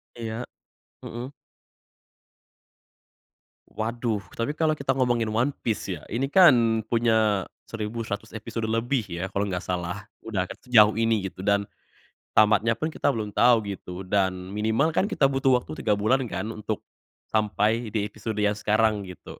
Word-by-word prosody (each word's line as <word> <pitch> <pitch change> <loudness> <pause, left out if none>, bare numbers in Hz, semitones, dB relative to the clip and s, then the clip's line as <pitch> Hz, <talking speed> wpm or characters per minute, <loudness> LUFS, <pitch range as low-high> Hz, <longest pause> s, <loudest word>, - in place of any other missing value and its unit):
Iya, 115 +1 -5 0.6
mhm. 125 +4 -6 2.4
Waduh, 110 -2 -2
tapi 145 +6 -3
kalo 155 -1 +2
kita 135 -1 0
ngomongin 120 -3 +1
One 115 +6 +1
Piece 110 -4 -2
ya, 80 - -5
ini 135 +5 -2
kan 120 -11 +6
punya 110 -4 +2 0.2
1100 110 -1 -5
episode 110 +1 -5
lebih 115 +2 0
ya 85 +3 -3
kalo 100 +1 -1
enggak 90 -3 -2
salah, 90 +2 -4 0.2
udah 100 -5 -2
ket - - -8
sejauh 110 -4 +6
ini 115 -3 +1
gitu 95 0 -9
dan 100 0 +2 0.7
tamatnya 110 +1 +4
pun 155 +1 -3
kita - - -2
belum 110 -6 0
tau 120 0 +4
gitu 95 -2 -6
dan 95 -1 -1
minimal 110 +9 +1
kan 190 +5 +1
kita 135 -7 +2
butuh 135 -1 +3
waktu 125 - -4
3 105 -2 +2
bulan 125 +5 +1
kan - - -3
untuk 110 -1 -4 0.5
sampai 110 +2 +1
di 105 0 -1
episode 105 +1 -5
yang 105 -1 +2
sekarang 105 -1 +1
gitu. 90 - -11
110 Hz, 150 wpm, -25 LUFS, 100-120 Hz, 2.4 s, kan